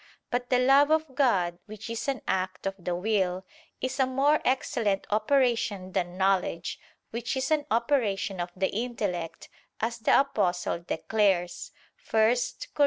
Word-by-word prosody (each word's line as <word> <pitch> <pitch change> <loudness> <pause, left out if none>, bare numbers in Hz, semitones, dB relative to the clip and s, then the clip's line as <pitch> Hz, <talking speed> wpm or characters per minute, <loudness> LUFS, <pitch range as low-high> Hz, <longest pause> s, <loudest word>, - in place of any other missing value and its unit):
But 245 0 -1
the 250 - +4
love 270 +3 +5
of 315 -3 +1
God, 190 - +2
which 215 +1 -9
is 230 +2 -4
an 275 -1 -2
act 185 0 -2
of 195 - 0
the 175 0 -1
will, 185 -1 0 0.4
is 255 +2 -3
a 265 - +4
more 275 +4 +2
excellent 230 -6 0
operation 220 -4 +1
than 175 0 -2
knowledge, 190 -3 0 0.3
which 240 +3 -3
is 265 +4 -1
an 300 -2 +1
operation 225 -5 0
of 175 - -3
the 190 0 0
intellect, 200 -8 -3 0.3
as 230 +1 -2
the 220 - +4
Apostle 185 -11 0
declares 180 -1 0 0.4
(1 220 +2 +4 0.4
Cor. - - -19
220 Hz, 150 wpm, -28 LUFS, 185-255 Hz, 0.4 s, love